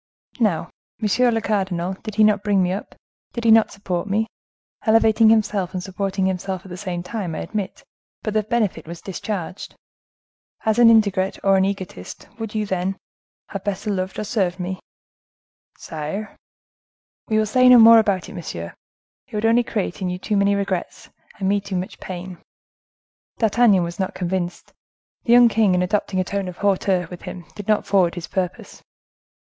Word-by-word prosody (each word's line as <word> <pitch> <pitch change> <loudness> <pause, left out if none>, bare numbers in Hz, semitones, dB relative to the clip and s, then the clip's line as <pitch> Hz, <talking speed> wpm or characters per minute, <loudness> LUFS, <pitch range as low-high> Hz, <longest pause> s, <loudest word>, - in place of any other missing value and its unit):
Now, 205 -9 +1 0.3
monsieur 235 +3 +2
le 225 -1 0
cardinal, 190 -4 -1
did 215 -2 -7
he 215 - +4
not 210 -2 +4
bring 205 -2 +2
me 180 - 0
up, 195 - -5 0.4
did 235 - -4
he 230 - +5
not 225 0 +6
support 185 -2 -3
me?—elevating 220 +1 +1
himself 205 -4 +1
and 180 - -3
supporting 195 0 -2
himself 190 0 -3
at - - -11
the 180 - -6
same 180 -2 -4
time, 180 -4 -4
I - - -4
admit; 205 -3 -5 0.4
but 215 - -2
the 215 - +2
benefit 210 -7 -1
was 170 0 -7
discharged. 190 0 -5 0.9
As 220 +1 +2
an 235 -1 +8
ingrate 200 -4 +3
or 195 0 +4
an 190 0 +3
egotist, 190 - -6
would 225 -1 -5
you, 215 -1 0
then, 190 0 -2 0.5
have 195 -2 -6
better 205 +1 -2
loved 185 -1 -3
or - - -2
served 195 -4 -1
me?" 185 +1 -4 1.0
"Sire!" 160 +7 -6 0.9
"We 215 - +1
will 215 - +3
say 255 +4 +4
no 250 - +9
more 230 0 +9
about 200 -4 0
it, - - -10
monsieur; 85 - -6 0.5
it - - -10
would 210 +1 -1
only 230 +2 +5
create 205 -5 -3
in 185 - -1
you 180 - -3
too 210 +3 -2
many 200 0 +3
regrets, 195 -3 -3 0.3
and 195 - -2
me 200 +1 +2
too 200 -1 -5
much 185 +2 -4
pain." 180 -1 -7 1.0
D'Artagnan 220 -4 +4
was 170 +2 -6
not 190 - -2
convinced. 180 -1 -3 0.5
The 235 - +4
young 245 0 +8
king, 215 -4 +3
in 180 - +2
adopting 190 0 -1
a - - +2
tone 200 +1 -3
of 180 - -7
hauteur 190 -3 +1
with 180 - -8
him, 175 -2 -8
did 205 - -9
not 215 -1 +2
forward 185 -4 +2
his 175 -2 -5
purpose. 185 -1 -4
195 Hz, 180 wpm, -22 LUFS, 185-215 Hz, 1.0 s, no